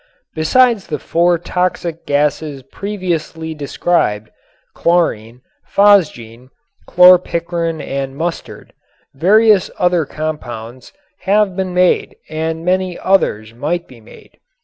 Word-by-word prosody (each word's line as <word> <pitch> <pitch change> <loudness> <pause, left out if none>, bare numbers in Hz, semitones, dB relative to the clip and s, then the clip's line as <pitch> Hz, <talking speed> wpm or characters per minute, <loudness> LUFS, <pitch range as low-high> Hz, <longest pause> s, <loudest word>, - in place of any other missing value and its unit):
Besides 225 +6 +2
the 150 - -3
four 170 +4 +1
toxic 175 -1 -3
gases 145 -1 -1
previously 165 -2 -4
described, 140 -8 -1 0.4
chlorine, 125 -9 0 0.3
phosgene, 130 - +2 0.4
chlorpicrin 170 -2 +3
and 135 0 -4
mustard, 170 +2 -5 0.4
various 205 +6 +4
other 175 -4 +1
compounds 125 -6 -6 0.4
have 205 -2 +2
been 185 -1 -3 0.5
and 160 +1 -4
many 185 0 0
others 115 - 0
might 165 +8 -3
be 120 -3 -16
made. 110 - -18
165 Hz, 95 wpm, -16 LUFS, 140-180 Hz, 0.5 s, various